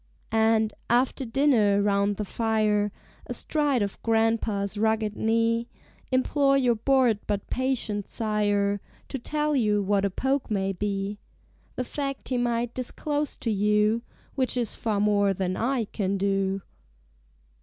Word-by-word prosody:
And, 220 -1 +3 0.2
after 255 +2 +2
dinner, 225 -5 +3
round 200 0 +2
the 210 - -3
fire, 215 -1 +1 0.4
Astride 290 -7 0
of 200 - -5
Grandpa's 225 -3 +1
rugged 220 0 0
knee, 230 +1 +1 0.4
Implore 275 +2 +3
your 250 -3 +3
bored 240 -1 +2
but 200 -1 -3
patient 245 -6 -1
sire 205 -2 0 0.3
To 270 - -4
tell 300 +4 -1
you 210 -5 +2
what 195 0 +1
a 200 - +2
Poke 265 +8 -1
may 195 -2 0
be. 200 +1 -3 0.6
The 255 - -1
fact 275 +1 -4
he 250 -2 0
might 240 0 0
disclose 290 +3 -2
to 230 - -2
you 210 +2 +2 0.3
Which 260 -2 0
is 235 -4 -1
far 215 -3 -1
more 205 -1 +2
than 185 0 -1
I 240 -1 0
can 200 -1 -2
do. 195 -1 0
220 Hz, 135 wpm, -26 LUFS, 205-250 Hz, 0.6 s, And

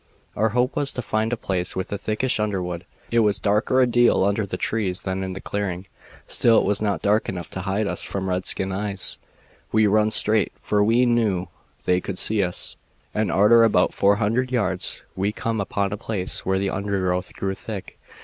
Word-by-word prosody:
"Our 110 +2 +2
hope 125 +4 0
was 140 -1 0
to 125 - -4
find 110 +1 -1
a 120 - -1
place 90 -3 -3
with 95 +1 -4
a 100 - -1
thickish 110 +3 0
underwood. 90 -4 -2 0.2
It 115 - +3
was 105 -2 +3
darker 105 +5 +2
a - - +6
deal 120 -4 +3
under 100 +1 +1
the 90 - -4
trees 95 -4 -1
than 95 0 -2
in 95 0 -4
the 95 - -6
clearing, 95 -2 -3 0.4
still 115 -2 +3
it - - +4
was 105 0 +1
not 100 -2 -1
dark 105 +2 +2
enough 90 -3 -6
to 95 - -4
hide 100 +3 -1
us - - -1
from 95 -1 -3
redskin 95 +1 -1
eyes. 100 0 -1 0.5
We 110 0 +4
run 105 +1 +3
straight, 110 -1 +2
for 105 -1 +1
we 115 +4 +4
knew 110 -7 +1 0.4
they 90 0 +2
could 95 0 -5
see 110 +1 +2
us, 90 -2 -3 0.4
and 110 0 0
arter 110 +4 +6
about 105 -5 +3
four 100 +1 +3
hundred 120 +5 0
yards 95 -7 -1
we 95 +2 0
come 110 0 -2
upon 100 0 -1
a - - -3
place 100 -5 -1
where 95 0 +2
the 95 0 -1
undergrowth 95 -2 -2
grew 95 0 -2
thick. 100 0 -8
100 Hz, 200 wpm, -23 LUFS, 95-110 Hz, 0.5 s, a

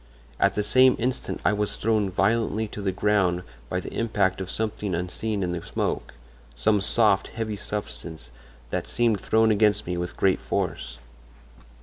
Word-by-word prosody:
At - - +3
the 105 - 0
same 130 +4 +5
instant 125 +3 -2
I - - +4
was 105 0 -1
thrown 110 -2 +1
violently 110 +3 +1
to 105 - -7
the 100 -1 0
ground 95 -3 +1 0.3
by - - -1
the - - -8
impact 100 -5 0
of 95 - -5
something 105 -4 -2
unseen 100 +4 -2
in 90 - -1
the 90 -1 -3
smoke—some 65 - -2
soft, 100 -1 +3
heavy 110 -2 -4
substance 85 -9 -6 0.4
that - - -2
seemed 115 -4 +1
thrown 110 0 +3
against 105 0 +3
me 90 0 -3
with 90 0 -4
great 95 -1 +3
force. - - -3
105 Hz, 155 wpm, -25 LUFS, 90-110 Hz, 0.4 s, same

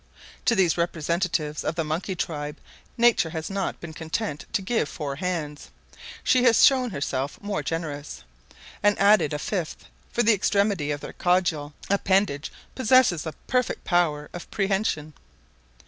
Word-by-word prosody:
To 230 - +4
these 175 -4 +2
representatives 170 -2 -1
of 160 - -2
the 165 - 0
monkey 165 +5 -3
tribe 150 -3 -4 0.4
nature 235 -8 +4
has 160 +3 -5
not 195 -1 -2
been 170 -2 -8
content 160 0 -4
to 210 -4 -1
give 205 -6 0
four 140 -3 -5
hands 155 -4 -4 0.5
she 255 - +4
has 235 -3 +6
shown 260 -2 +4
herself 140 -5 -3
more 205 -1 -3
generous, 150 - -5 0.6
and 205 0 +3
added 200 -6 +4
a 150 - -1
fifth, 170 +1 -4 0.3
for 240 - +1
the 230 - +5
extremity 200 -5 +1
of 145 -1 -2
their - - -8
caudal 175 -5 0
appendage 190 -6 +1 0.2
possesses 240 - +3
a 160 - -4
perfect 250 -1 0
power 155 -5 +1
of 175 - -8
prehension. 195 -6 -1
175 Hz, 145 wpm, -25 LUFS, 150-205 Hz, 0.6 s, has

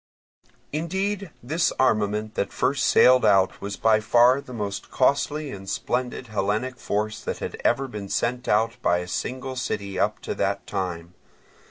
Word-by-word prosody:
Indeed 190 +5 -2
this 165 +7 +1
armament 110 -3 +1
that - - -2
first 140 -1 +1
sailed 130 0 +6
out 95 -3 +3
was 100 0 -5
by 110 -1 +4
far 120 +5 +4
the 130 - -13
most 105 -4 -4
costly 140 +2 +1
and 95 -1 -8
splendid 125 +4 -2
Hellenic 110 +4 -1
force 105 +1 -2
that - - -4
had - - -6
ever 135 +3 +2
been 105 -5 -7
sent 125 +4 -1
out 110 +2 +2
by 85 - +3
a 90 0 -4
single 130 +7 -4
city 100 -6 -3
up - - +1
to - - -3
that - - -1
time. 85 -2 -4
120 Hz, 160 wpm, -25 LUFS, 100-130 Hz, -, sailed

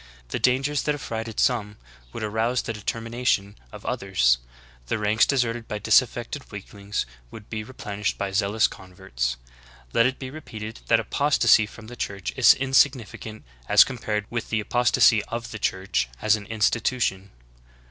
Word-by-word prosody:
The - - -2
dangers 135 +3 +2
that 150 - 0
af 145 - -9
frighted 115 -1 -4
some 105 -4 +1 0.3
would - - -6
arouse 110 +4 0
the 115 - -4
determination 115 -1 -1 0.2
of - - -11
others; 60 -11 +2 0.5
the - - 0
ranks 105 +1 +3
deserted 120 -4 0
by 105 - -3
disaffected 120 +4 +1
weaklings 100 0 -5 0.2
would 105 - -12
be 110 -1 -3
re 130 +4 -13
plenished 105 -2 -3
by 100 -1 -3
zealous 100 +3 +2
converts. 90 -11 -5 0.6
Let 115 - +5
it 130 - -3
be 130 -1 -7
repeated 110 -7 -8
that 115 - +4
apos 140 +6 +1
tasy 110 -2 +5
from 115 - -13
the 120 +2 -10
Church 100 -4 -4
is 130 - +7
insignificant 130 -5 +1 0.3
as 105 - +8
compared 110 -5 -3
with 115 -1 -3
the 110 - 0
apostasy 120 -1 +4
of 115 +1 -5
the 110 - -6
Church 95 -12 -1
as 110 0 +3
an 105 -2 -8
institution. 110 -2 0
110 Hz, 160 wpm, -25 LUFS, 100-120 Hz, 0.6 s, as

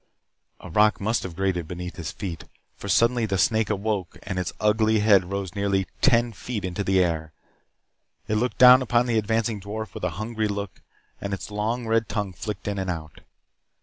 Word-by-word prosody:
A - - -10
rock 105 +4 +4
must 110 +4 0
have 90 -3 -7
grated 90 -3 -1
beneath 90 +1 -6
his 85 -4 -4
feet, 90 -6 -6 0.3
for - - -8
suddenly 115 -1 +3
the 95 -2 0
snake 110 +1 +2
awoke 100 -3 -2
and 95 -2 -3
its 90 - -2
ugly 110 +1 +3
head 100 -4 +5
rose 95 -1 -4
nearly 100 -1 0 0.2
ten 120 -4 +3
feet 105 0 -5
into 90 +2 -3
the 95 -1 +3
air. 80 -2 -2 0.9
It 105 - +1
looked 125 +3 -1
down 125 +1 +9
upon 120 -1 +2
the 115 -2 +2
advancing 110 0 -1
dwarf 110 +2 -6
with - - -8
a - - +1
hungry 110 0 -2
look 100 -1 -5 0.4
and 100 -1 -2
its 95 - -9
long 110 +4 -2
red 115 -1 +1
tongue 105 -3 -2
flicked 100 +2 -6
in 100 -1 -2
and 95 -1 -2
out. 80 -4 -5
105 Hz, 190 wpm, -25 LUFS, 95-110 Hz, 0.9 s, down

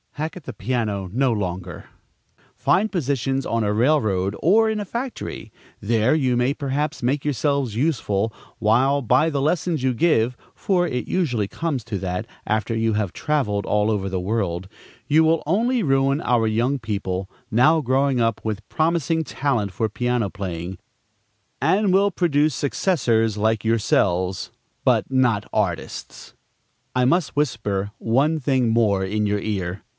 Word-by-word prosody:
Hack 155 +2 -4
at 175 - -10
the 130 - -7
piano 105 -4 -2
no 130 +1 +2
longer! 90 -4 -4 0.7
Find 210 +4 +2
positions 135 - -1
on 115 -1 0
a 105 0 0
railroad 105 -6 +1
or 220 +6 +4
in 220 -1 -1
a 205 - -3
factory. 240 +5 -5 0.3
There 115 +4 +2
you 130 -5 +2
may 125 +3 +2
perhaps 140 +1 -2
make 135 +4 0
yourselves 140 -4 0
useful; 115 -6 0 0.3
while 130 +6 +3
by 130 +6 +3
the 140 -3 -1
lessons 160 +1 0
you 130 -1 +2
give 125 -4 +2 0.2
(for 180 -3 +1
it 125 -5 -3
usually 125 - 0
comes 150 -1 -3
to 100 - -3
that, 90 -1 -3 0.2
after 110 +2 -1
you 115 0 +1
have 105 -4 -1
travelled 110 -11 -1
all 105 +1 +1
over 100 -3 -1
the 95 -1 -2
world) 95 -2 -2 0.4
you 155 +4 +4
will 160 0 +2
only 235 +8 +2
ruin 135 -3 +2
our 120 -2 +2
young 120 +6 +1
people, 100 -5 -3 0.2
now 150 +9 +4
growing 135 -1 +1
up 115 -2 +1
with 110 -1 -4
promising 160 0 +1
talent 125 -10 -1
for 110 +4 -1
piano 120 -1 -1
playing, 90 -2 -5 0.8
and 190 +7 +2
will 200 +1 +4
produce 155 -4 +2
successors 120 - +1
like 110 +1 +1
yourselves, 95 -5 +1 0.3
but - - +2
not 125 -6 +2
artists. 95 -6 -3 0.6
I 125 0 +3
must 170 +4 +1
whisper 105 -8 -1
one 140 +8 +1
thing 130 -3 +1
more 110 -4 +2
in 105 +2 -1
your 105 0 0
ear. 95 -3 -3
125 Hz, 150 wpm, -22 LUFS, 105-150 Hz, 0.8 s, or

